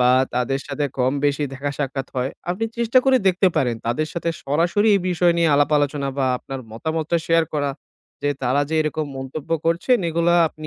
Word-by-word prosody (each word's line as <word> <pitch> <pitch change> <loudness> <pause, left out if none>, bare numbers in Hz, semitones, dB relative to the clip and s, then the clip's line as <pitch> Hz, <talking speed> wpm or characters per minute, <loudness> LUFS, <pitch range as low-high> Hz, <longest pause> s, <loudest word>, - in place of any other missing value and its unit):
বা 125 0 +5 0.2
তাদের 130 +2 0
সাথে 145 - -2
কম 130 +1 +2
বেশি 145 +1 +1
দেখা 140 +1 -3
সাক্ষাৎ 135 -2 -2
হয়, 130 +2 0 0.2
আপনি 185 +5 -1
চেষ্টা 235 +2 +4
করে 265 -1 +5
দেখতে 185 +1 +3
পারেন 120 -3 +2
তাদের 155 +7 0
সাথে 170 -1 -2
সরাসরি 170 +9 +2
এই - - -1
বিষয় 175 0 +3
নিয়ে 165 -1 +3
আলাপ 145 +1 +3
আলোচনা 145 -1 -1
বা 135 - +2
আপনার 135 +1 -7
মতামতটা 160 +6 -1
শেয়ার 165 0 +3
করা। 145 -1 0 0.5
যে 145 - +1
তারা 130 +3 +2
যে 160 - 0
এরকম 155 0 -2
মন্তব্য 135 +4 -7 0.2
করছেন 175 +10 +2
এগুলা 170 +1 +2
আপনি 155 0 -10
150 Hz, 190 wpm, -22 LUFS, 135-170 Hz, 0.5 s, বা